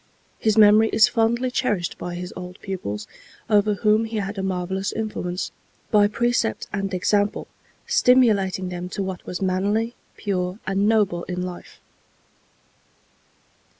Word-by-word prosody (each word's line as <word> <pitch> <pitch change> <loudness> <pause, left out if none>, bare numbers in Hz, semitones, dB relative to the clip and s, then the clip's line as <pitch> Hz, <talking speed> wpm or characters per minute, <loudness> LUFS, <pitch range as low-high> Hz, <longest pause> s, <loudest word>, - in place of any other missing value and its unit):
His 220 -1 +1
memory 215 +1 +7
is 220 - +6
fondly 240 +1 +1
cherished 210 -10 -1
by 175 -1 -5
his 180 +1 -6
old 180 0 -8
pupils, 105 - -5 0.5
over 210 0 +4
whom 215 +3 +2
he 225 0 -4
had 200 0 -3
a - - -1
marvellous 190 +1 -2
influence, 195 -5 -3 0.4
by 205 -2 +5
precept 235 - 0
and 195 -1 -2
example 205 +3 0 0.4
stimulating 200 -7 +3
them 180 0 -5
to 195 - -3
what 190 -2 -5
was 180 +2 -4
manly, 205 +5 0 0.2
pure 185 -2 -2
and 195 +2 +1
noble 200 -6 +2
in 180 0 -3
life. 180 -1 -8
195 Hz, 135 wpm, -23 LUFS, 180-220 Hz, 0.5 s, memory